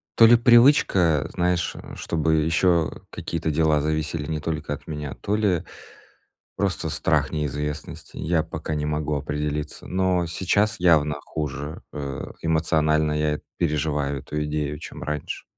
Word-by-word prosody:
то 115 - +8
ли 120 +1 +8
привычка, 115 - +5
знаешь, 90 0 0 0.2
чтобы 80 -1 0
ещё 85 0 +1
какие-то 85 -1 -3
дела 75 -1 +3
зависели 75 0 -1
не 80 - -1
только 75 -1 -3
от 75 - -8
меня, 75 -3 -5
то 105 - -2
ли 100 -6 +1 0.9
просто - - -1
страх 75 -5 +1
неизвестности. 75 0 -4
Я 80 0 +1
пока 80 - -5
не 75 0 -1
могу 75 0 -1
определиться. 75 +1 -3
Но 90 -1 +1
сейчас 100 +5 +1
явно 75 -4 +4
хуже, 75 0 -5
э, 70 -2 -5
эмоционально 80 -1 +2
я 75 0 0 0.2
переживаю 75 -3 0
эту 75 +2 -3
идею, 75 -1 -2
чем - - -9
раньше. 75 0 -4
75 Hz, 135 wpm, -24 LUFS, 75-85 Hz, 0.9 s, то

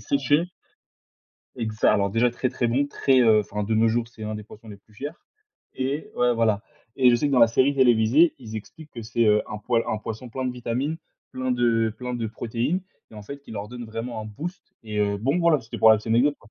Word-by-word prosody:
séchée 145 +5 +1 1.1
Exa 110 -2 +1
alors, 100 -1 +1
déjà, 120 +3 +2
très, 125 +2 -2
très 125 -1 -1
bon, 135 +5 +1
très, 135 -2 +2
heu, 110 -3 +5
enfin, 105 0 -4
de 110 +2 -1
nos 115 +1 +4
jours, 115 +1 0
c'est 115 -2 -13
1 110 0 -4
des 105 - -6
poissons 110 +1 -15
les 105 - -9
plus 105 +1 -26
chers 145 +9 -7 0.5
et 135 +4 -3
ouais, 125 0 +3
voilà. 110 -2 +1 0.3
Et 130 -2 +5
je - - +4
sais 145 +3 0
que - - -2
dans 130 - +4
la 115 - +8
série 130 +5 +2
télévisée, 125 +5 +4
ils 110 -4 -8
expliquent 150 +8 -10
que 120 - -7
c'est, 115 +1 0
heu, 105 0 +4
un 105 - -4
poil 115 +2 0
un - - 0
poisson 115 +3 -7
plein 130 +2 -4
de 125 - -2
vitamines, 125 +6 -3 0.3
plein 130 0 -3
de 115 -2 +2
plein 125 0 -5
de 115 -2 -2
protéines 120 - -2 0.3
et - - -15
en 105 - -9
fait, 140 +7 -9
qui - - -15
leur 105 -1 -5
donne 120 0 -8
vraiment 115 +1 -5
un - - -8
boost 160 - -7 0.2
et 105 -1 -4
heu, 100 -1 0
bon, 135 - 0
voilà, 170 -4 +3
c'était 115 - -8
pour 110 - +7
la 110 - +7
petite 110 - -9
anecdote, 130 +6 +3
quoi. 105 - -21
120 Hz, 245 wpm, -24 LUFS, 110-130 Hz, 1.1 s, la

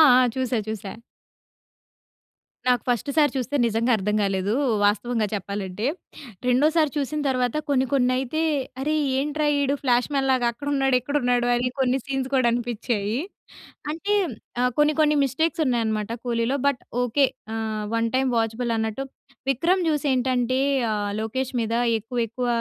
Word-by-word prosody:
ఆ! 255 0 +5
చూసా, 255 -2 0
చూసా. 210 -3 -5 1.8
నాకు 250 -1 +3
ఫస్ట్ 245 +3 0
సారి 295 -3 +5
చూస్తే 260 +2 -2
నిజంగా 230 +2 +1
అర్థం 210 +2 -1
కాలేదు, 195 +1 0 0.3
వాస్తవంగా 215 +2 +1
చెప్పాలంటే. 200 +1 -4 0.6
రెండోసారి 305 +5 +3
చూసిన 295 +2 -1
తర్వాత 250 0 0
కొన్ని, 265 -1 +3
కొన్ని 250 -2 +3
అయితే, 265 +5 -2 0.4
"అరే! 305 +2 0 0.3
ఏంట్రా 300 +1 -1
ఈడు 280 0 +1
ఫ్లాష్మన్ 270 +2 +1
లాగా 250 -2 +2
అక్కడున్నాడు, 270 +1 0
ఇక్కడున్నాడు 245 -3 +1
అని 250 +1 0
కొన్ని 260 0 +2
సీన్స్ 270 -1 -2
కూడా 255 -3 +3
అనిపించాయి. 230 -2 -2 0.7
అంటే 365 +7 -2 0.5
ఆహ్, 250 0 +2
కొన్ని 295 0 +4
కొన్ని 300 -1 +4
మిస్టేక్స్ 320 +5 0
ఉన్నాయన్నమాట 225 -4 0
కూలీలో 235 +2 0
బట్ 280 -4 +1 0.2
ఓకె 250 +3 +3 0.3
ఆహ్, 220 -1 -3
1 230 0 +1
టైమ్ 265 0 +2
వాచబుల్ 225 +1 -1
అన్నట్టు 220 +4 -2 0.5
'విక్రమ్' 340 +7 +2
చూసి 300 -1 -1
ఏంటంటే 255 0 +1 0.3
ఆహ్, 205 -1 -2
లోకేష్ 260 +4 -3
మీద 225 0 -2 0.3
ఎక్కువ, 230 +4 -7
ఎక్కువ 245 +2 -3
250 Hz, 140 wpm, -24 LUFS, 225-275 Hz, 1.8 s, ఆ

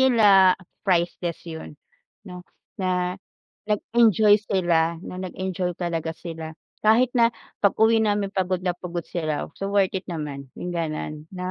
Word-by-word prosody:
nila, 235 -6 +5 0.6
priceless 175 -2 0
yun 160 -1 -7 0.6
'no, 180 -1 -8 0.4
na, 185 -1 0 0.8
nag-enjoy 215 -1 +4
sila, 170 -3 +2
na - - -7
nag-enjoy 185 -1 -3
talaga 165 -2 -2
sila. 160 -2 -6 0.3
Kahit 230 +4 +5
na 230 -1 +4 0.3
pag-uwi 220 +3 +4
namin 205 -1 +1
pagod 185 -2 0
na 180 -1 0
pagod 175 -2 -5
sila, 155 -4 -2
so 195 0 -4
worth 195 -2 +3
it 185 - -5
naman, 145 -6 -6
yung 180 - -5
gano'n, 155 -3 -3 0.2
'no? 180 0 -4
180 Hz, 135 wpm, -24 LUFS, 170-205 Hz, 0.8 s, nila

